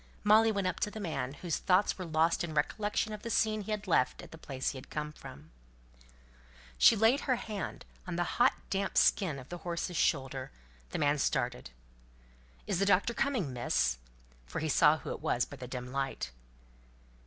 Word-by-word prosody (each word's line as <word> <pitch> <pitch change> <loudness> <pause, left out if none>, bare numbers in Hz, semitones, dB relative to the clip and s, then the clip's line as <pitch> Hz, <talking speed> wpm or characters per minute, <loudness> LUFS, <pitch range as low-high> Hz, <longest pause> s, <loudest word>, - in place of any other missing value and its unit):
Molly 220 +2 +6
went 200 -2 -1
up 185 -1 -1
to - - 0
the 215 - -8
man, 155 -9 -3
whose 170 -4 -1
thoughts 190 +2 +3
were 185 - -4
lost 165 +2 +2
in 160 -3 -5
recollection 210 +7 0
of 210 - -7
the 230 - -5
scene 215 -1 +1
he 205 - -9
had 210 -1 -2
left 145 -9 +1
at - - -12
the 160 - -10
place 135 -4 -3
he 140 - -8
had - - -14
come 150 0 -4
from. 75 - -12 1.3
She - - +8
laid 225 +6 +4
her 260 -4 +1
hand 215 -4 -5 0.2
on 180 - -3
the 175 - +1 0.2
hot 250 - +6 0.2
damp 195 0 -1
skin 160 -8 +3
of 130 0 -11
the 175 - -6
horse's 170 0 -3
shoulder; 135 -4 0 0.4
the - - -3
man 145 -1 +2
started. 65 - -1 1.0
"Is - - -1
the 195 - +3
doctor 200 +4 +3
coming, 230 - -1
Miss?" 60 - 0 0.5
For - - -6
he 160 - -1
saw 150 +1 +5
who - - -7
it - - -6
was 120 - +1
by 145 - -11
the 125 -1 -7
dim 125 0 -6
light. 135 - -3
170 Hz, 195 wpm, -31 LUFS, 135-210 Hz, 1.3 s, She